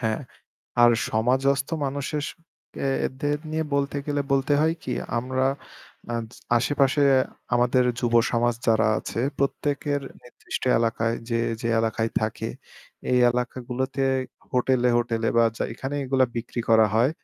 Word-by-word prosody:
হ্যাঁ, 110 -2 -1 0.6
আর 120 - +8 0.2
সমাজস্থ 130 +4 +1 0.2
মানুষদেরকে 145 0 -3
নিয়ে 160 0 -1
বলতে 140 0 0
গেলে 145 -1 0
বলতে 135 +1 +2
হয় 160 +1 +2
কি, - - -3 0.3
আমরা 130 +2 -1 0.6
অ্যা 120 - -2 0.4
আশেপাশে 135 +3 +2 0.5
আমাদের 125 +1 +3 0.2
যুব 120 -1 0 0.2
সমাজ 120 0 +2
যারা 110 -1 +4
আছে - - -4 0.2
প্রত্যেকের 145 +1 -1 0.2
নির্দিষ্ট 125 - -7 0.2
এলাকায় 115 0 0
যে, 115 -1 +1 0.2
যে 115 - -2
এলাকায় 115 0 -1
থাকে, 110 +1 -2 0.6
এই 125 - +4
এলাকাগুলোতে 125 +2 -2 0.5
হোটেলে, 125 0 +2
হোটেলে 115 -1 0
বা 115 - +6
চা - - -1
এখানে 135 +3 -5
এগুলা 130 0 +3
বিক্রি 120 +1 -3
করা 110 -1 +6
হয়, 120 +5 +4
125 Hz, 125 wpm, -25 LUFS, 115-140 Hz, 0.6 s, আর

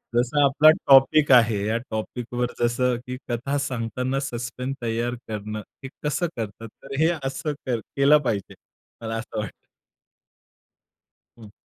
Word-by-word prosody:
जसा 130 +4 +2
आपला 145 +3 +6 0.2
टॉपिक 135 +2 +6
आहे, 115 -5 +5
या 115 +1 +1
टॉपिकवर 120 +2 -3
जसं 120 +1 +1
की 125 0 -4
कथा 135 +4 -1
सांगताना 130 0 -2
सस्पेन्स 125 +1 -4
तयार 120 +2 -1
करणं, 105 0 -5 0.2
हे 135 - -6
कसं 150 +4 0
करतात. 115 +1 -5 0.2
तर 135 0 -7
हे 160 +1 +4
असं 135 +3 -3
कर 120 -3 0 0.2
केलं 140 +2 +6
पाहिजे. 100 -3 -2 0.5
मला 115 0 -4
असं 110 -1 -5
वाटतं. 105 - -7 1.7
हं. 110 -3 -13
125 Hz, 135 wpm, -24 LUFS, 115-135 Hz, 1.7 s, आपला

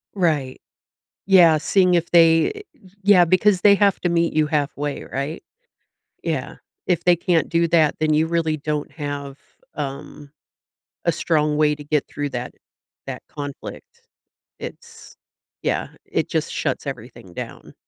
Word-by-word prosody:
Right. 155 -9 0 0.7
Yeah, 175 -5 +6
seeing 180 +4 +2
if 170 -1 +1
they 165 -1 +5
eh 420 - -8 0.4
yeah, 195 -2 +6
because 185 +2 +3
they 200 -1 +7
have 200 -1 +3
to 175 - +1
meet 170 -1 +1
you 155 0 +3
halfway, 145 -1 -2
right? 140 +4 -4 0.8
Yeah. - - -3 0.3
If 175 -2 +1
they 175 0 +5
can't 170 -2 +1
do 170 0 +2
that, 160 -3 +3
then 155 0 +2
you 155 +1 +3
really 165 -2 0
don't 150 0 -3
have, 145 -2 -6 0.4
um, 140 +1 -7 0.7
a 170 - +2
strong 150 -2 +1
way 150 -1 +3
to 145 0 -11
get 150 -1 0
through 145 0 -4
that - - -5 0.5
that - - -6
conflict. 145 -1 -9 0.6
It's - - -11 0.5
yeah. - - -1 0.2
It - - -1
just - - -1
shuts - - -2
everything - - -8
down. - - -8
160 Hz, 145 wpm, -22 LUFS, 145-175 Hz, 0.8 s, they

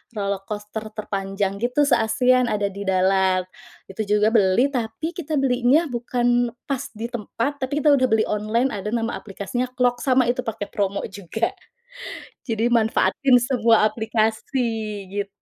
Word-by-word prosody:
roller 200 -1 -1
coaster 210 +1 -5 0.2
terpanjang, 195 -1 -3
gitu, 250 +5 +1
se-ASEAN 250 0 +3
ada 205 -2 -1
di 200 0 -7
dalam. 190 0 +2 0.5
Itu 210 +1 -4
juga 210 +1 +3
beli, 225 +5 +3
tapi 245 +6 -3
kita 315 -4 -4
belinya 270 +3 +2
bukan 240 0 0
pas 275 -2 -3
di 235 +3 -5
tempat, 240 +5 -3
tapi 285 +3 -2
kita 300 - +6
udah 260 -2 +4
beli 220 -1 +3
online. 215 +5 0
Ada 210 +3 -3
nama 230 0 -1
aplikasinya 220 +5 -4
Klook, 245 -1 +1
sama 260 -1 +3
itu 250 - -7
pakai 220 -4 -4
promo 200 -2 -1
juga. 205 +4 -2 1.0
Jadi 230 +2 0
manfaatin 245 +3 +3
semua 235 -3 +3
aplikasi, 220 +3 -1 0.6
gitu 200 - -4
225 Hz, 145 wpm, -23 LUFS, 205-250 Hz, 1.0 s, kita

